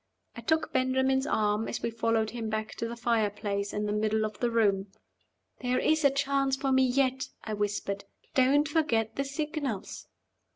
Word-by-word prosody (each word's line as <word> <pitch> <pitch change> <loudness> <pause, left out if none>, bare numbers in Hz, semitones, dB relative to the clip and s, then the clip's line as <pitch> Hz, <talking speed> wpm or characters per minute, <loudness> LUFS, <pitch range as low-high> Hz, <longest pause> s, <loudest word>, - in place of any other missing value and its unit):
I 235 - -7
took 320 +7 0
Benjamin's 265 +1 +2
arm 215 -3 +1
as - - -4
we 235 - 0
followed 225 -1 0
him 230 -2 -4
back 215 0 -3
to 230 - -2
the 235 - -5
fire 230 -3 +1
place 200 0 -3
in 210 0 -2
the 205 - -1
middle 215 +1 +1
of 215 -1 -6
the 240 - +1
room. 205 -4 +2 0.7
"There 250 0 0
is 315 0 +2
a 280 - +7
chance 275 0 +1
for 270 0 -1
me 260 0 +5
yet," 260 +1 +1 0.2
I 220 - -4
whispered. 205 -1 -2 0.3
"Don't 275 +3 +4
forget 235 -8 +1
the 275 - 0
signals." 280 - -4
235 Hz, 180 wpm, -29 LUFS, 215-270 Hz, 0.7 s, a